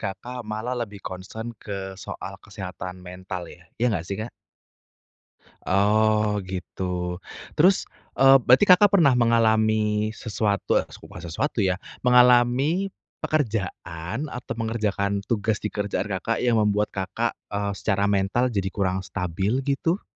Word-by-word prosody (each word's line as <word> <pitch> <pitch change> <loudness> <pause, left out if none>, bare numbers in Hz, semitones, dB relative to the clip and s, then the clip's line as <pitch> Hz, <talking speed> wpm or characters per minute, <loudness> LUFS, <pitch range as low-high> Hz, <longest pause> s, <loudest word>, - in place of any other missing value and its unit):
Kakak 120 +6 -5
malah 110 +2 -4
lebih 105 -6 -5
concern 110 +5 -6
ke 95 -2 -5
soal - - -7
kesehatan 90 -1 -7
mental 90 0 -6
ya? - - -14
Ya 120 0 +1
gak 85 -3 -3
sih, 100 - -3
Kak? 110 +3 -5 1.4
Oh 105 +1 +2
gitu. 90 0 -4 0.4
Terus, 180 +5 +4 0.3
eee, 135 0 +8
berarti 125 - +6
Kakak 195 +2 +7
pernah 165 -10 +5
mengalami 110 -2 +2
sesuatu, 105 -3 -1
es - - -13
bukan 85 - -11
sesuatu 100 - -2
ya, 95 -1 +1 0.2
mengalami 125 +9 +4 0.3
pekerjaan 100 - -2
atau 125 -4 -6
mengerjakan 105 -3 -1
tugas 105 0 -1
di 105 - -2
kerjaan 105 0 -2
Kakak 115 +3 -2
yang 120 -2 +3
membuat 105 0 +2
Kakak, 100 +5 -2 0.2
eee, 100 -1 -2
secara 100 0 +1
mental 100 +6 +1
jadi 100 -4 -1
kurang 95 -2 -1
stabil, 100 +7 -1
gitu? 155 +7 0
105 Hz, 130 wpm, -24 LUFS, 95-120 Hz, 1.4 s, eee